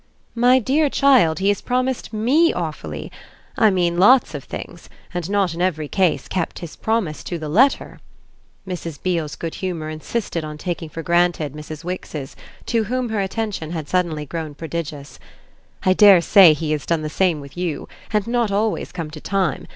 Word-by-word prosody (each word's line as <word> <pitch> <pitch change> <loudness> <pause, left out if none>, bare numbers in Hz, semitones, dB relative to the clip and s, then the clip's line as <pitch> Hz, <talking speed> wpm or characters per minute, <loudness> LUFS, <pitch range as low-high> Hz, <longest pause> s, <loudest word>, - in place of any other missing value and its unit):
"My 245 +2 +5
dear 280 +5 +2
child, 255 -14 +4
he 195 +1 +1
has 205 - 0
promised 255 0 -1
ME 260 +10 +3
awfully; - - -5 0.4
I 220 - +5
mean 175 -3 +1
lots 245 +7 +5
of - - -5
things, - - -9 0.2
and 175 0 -3
not 200 -4 +1
in 170 - -5
every 155 -5 0
case 185 +1 +1
kept 180 -3 -3
his 170 -3 -8
promise 220 -9 -1
to 175 - -3
the 155 -2 -6
letter." 250 - +2 0.7
Mrs. 170 -5 -5
Beale's 165 -5 -1
good 165 -1 -5
humour 165 -5 -3
insisted 165 +2 -3
on 150 0 -6
taking 170 0 -4
for 165 +1 -7
granted 170 -4 +1
Mrs. 150 +1 -8
Wix's, 165 -6 -6 0.3
to 230 -2 0
whom 250 +2 -2
her 220 -2 -1
attention 195 -4 -3
had 160 -3 -4
suddenly 170 -4 -1
grown 155 0 -5
prodigious. 155 -3 -6 0.6
"I 185 - +4
dare 195 -3 +7
say 175 -1 +7
he 155 0 -3
has 150 -2 -2
done 165 -2 0
the - - -2
same 170 0 +1
with 140 0 -11
you, 175 -5 -3 0.2
and 210 -1 +1
not 235 -2 0
always 210 +2 -1
come 165 -4 -5
to 155 -1 -9
time. 190 -8 -1
175 Hz, 180 wpm, -21 LUFS, 155-210 Hz, 0.7 s, dare